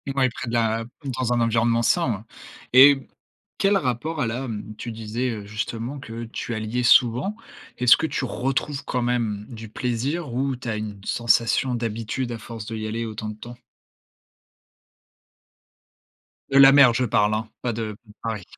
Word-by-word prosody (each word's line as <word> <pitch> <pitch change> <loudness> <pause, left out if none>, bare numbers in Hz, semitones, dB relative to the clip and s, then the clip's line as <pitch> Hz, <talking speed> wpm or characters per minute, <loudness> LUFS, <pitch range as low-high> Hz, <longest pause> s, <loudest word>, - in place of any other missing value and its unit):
Ouais, 130 -2 +3
près 120 0 -6
de - - -5
la 115 -1 +1 0.3
dans 125 -2 -1
un 120 - +2
environnement 115 0 +2
sain, 170 +1 +2
ouais, 105 0 -5 0.5
et 135 +1 +7 0.5
quel 200 -1 +3
rapport 145 +2 -2
elle 115 -2 0
a, 125 +1 -4
mmh, 110 0 -6
tu 120 - -6
disais, 115 +3 -3
heu, 105 -2 -6
justement, 115 +5 -4
que 115 -2 -7
tu 115 +1 -5
alliais 110 +3 -2
souvent, 125 - +4 0.4
est-ce 125 -1 +7
que 160 - -2
tu 135 - -2
retrouves 135 +3 -2
quand 125 - -2
même 115 -4 -1
du 110 -2 -9
plaisir 125 +5 -2
ou 135 +1 -1
tu 125 - -9
as 110 - -1
une 105 -2 -5
sensation 120 +2 +2
d'habitude 115 +2 -3
à - - -5
force 110 -1 -8
d'y 110 -1 -5
aller 115 +2 -3
autant 110 0 -5
de 105 - -7
temps? 120 +3 -10 3.0
De 135 - +4
la 135 0 +10
mer, 140 -4 +7
je 125 +2 +1
parle, 105 -1 +2
hein, 110 +1 -2
pas 120 -2 -1
de 110 -1 -4 0.3
Paris. 110 -4 -4
120 Hz, 170 wpm, -24 LUFS, 110-130 Hz, 3.0 s, la